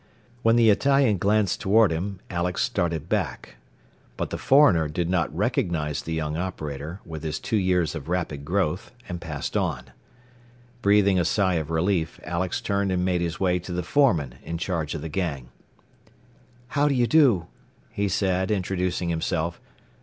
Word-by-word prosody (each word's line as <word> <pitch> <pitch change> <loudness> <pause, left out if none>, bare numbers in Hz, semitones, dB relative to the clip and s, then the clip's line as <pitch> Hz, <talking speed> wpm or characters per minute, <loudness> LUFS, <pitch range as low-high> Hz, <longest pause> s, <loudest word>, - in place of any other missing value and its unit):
When 115 0 +4
the 115 -2 +6
Italian 135 -3 +3
glanced 105 +1 +1
toward 105 -2 +4
him, 95 +4 -3
Alex 90 0 -1
started 85 - -1
back. 75 - -3 0.6
But - - -3
the - - -2
foreigner 130 - +5
did 85 +3 -2
not 90 -2 +1
recognize 75 -4 0
the 80 - -5
young 75 -1 -2
operator, 80 -2 -5
with 80 -2 -7
his 80 -1 -3
two - - -2
years 90 -5 +1
of 80 -1 -7
rapid 85 -6 -2
growth, 90 +1 -1 0.2
and 90 -1 -5
passed 75 0 -5
on. 75 -11 -2 0.9
Breathing 100 -2 +4
a - - +2
sigh 95 +2 +1
of 75 - -8
relief, 80 0 0
Alex 85 +1 -2
turned 100 -1 0
and 90 -1 0
made 90 -2 +1
his 85 -2 -3
way 90 -2 +2
to 90 +1 -8
the 90 0 -2
foreman 80 - +2
in 85 - -4
charge 85 -3 -2
of 75 - -5
the - - -3
gang. 75 -8 -3 1.2
"How 145 +1 +2
do 140 - +1
you 120 -1 +3
do," 120 - +4 0.5
he 100 0 -1
said, 95 0 0
introducing 90 -3 -1
himself. 85 0 -2
90 Hz, 165 wpm, -25 LUFS, 80-100 Hz, 1.2 s, the